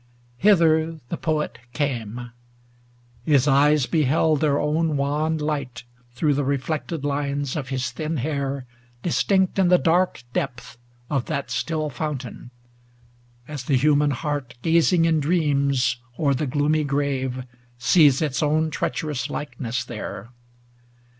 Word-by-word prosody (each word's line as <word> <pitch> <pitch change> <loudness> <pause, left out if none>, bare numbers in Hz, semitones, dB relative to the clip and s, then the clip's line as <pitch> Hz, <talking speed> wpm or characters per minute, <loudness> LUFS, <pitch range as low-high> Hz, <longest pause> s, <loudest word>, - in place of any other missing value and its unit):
Hither 165 -5 +3
the - - -2
Poet 155 -2 -2
came. 120 -3 -3 0.9
His 140 -1 +3
eyes 145 0 +4
beheld 155 0 +2
Their 145 -2 +2
own 155 0 +1
wan 150 +3 0
light 145 -5 -3 0.3
through 145 +4 +2
the 145 +1 0
reflected 145 +2 -2
lines 140 -1 -1
470 - - -1
Of 135 - -6
his 130 -2 -2
thin 155 0 -3
hair, 140 -1 -2 0.4
distinct 190 +2 +1
in 190 - +4
the 180 0 +6
dark 175 -5 +1
depth 125 0 -4 0.3
Of 135 -3 -1
that 140 -3 -3
still 155 -2 -2
fountain; 130 -3 -5 1.0
as 145 -4 -6
the 135 -1 +2
human 145 +2 +3
heart, 145 -3 -3
Gazing 165 +1 +4
in 160 -1 +3
dreams 140 -6 +1 0.2
over 140 -3 +2
the 140 +3 -1
gloomy 150 +3 +1
grave, 135 -3 -1 0.3
Sees 140 +3 +4
its 140 -4 -1
own 155 +1 +1
treacherous 150 -6 -2
likeness 125 -4 -4
there. 115 -2 -7
145 Hz, 130 wpm, -23 LUFS, 135-155 Hz, 1.0 s, the